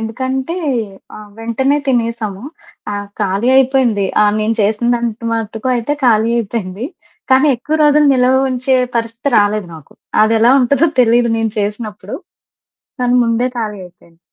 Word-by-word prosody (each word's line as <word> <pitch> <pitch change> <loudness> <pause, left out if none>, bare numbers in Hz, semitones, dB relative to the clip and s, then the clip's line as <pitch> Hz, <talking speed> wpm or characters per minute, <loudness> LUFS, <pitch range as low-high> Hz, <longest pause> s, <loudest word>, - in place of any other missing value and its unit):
ఎందుకంటే, 260 +7 -3 0.6
ఆహ్, 210 -1 -12
వెంటనే 265 +5 0
తినేశాము. 230 -5 -2 0.5
ఆ! - - -3 0.3
ఖాళీ 200 +4 0
అయిపోయింది. 255 -6 +2 0.2
ఆహ్, 205 - +3
నేను 215 +1 0
చేసినదంత 235 +2 0
మటుకు 225 +1 -3
అయితే 240 +4 -1
ఖాళీ 225 -1 +3
అయిపోయింది, 210 0 -4 0.5
కానీ 265 +3 +4
ఎక్కువ 300 +6 -2
రోజులు 295 0 +4
నిలవ 255 +1 +3
ఉంచే 255 +1 +1 0.2
పరిస్థితి 230 +4 -2
రాలేదు 205 -2 0
నాకు. 155 -3 -14 0.3
అదెలా 225 +2 +3
ఉంటదో 280 +6 +2
తెలీదు 235 0 +3
నేను 225 -1 -1
చేసినప్పుడు, 210 -1 -4 0.8
కానీ 245 0 +1
ముందే 230 +2 0
ఖాళీ 210 -3 -4
అయిపోయింది. 170 -1 -23
230 Hz, 130 wpm, -15 LUFS, 210-255 Hz, 0.8 s, కానీ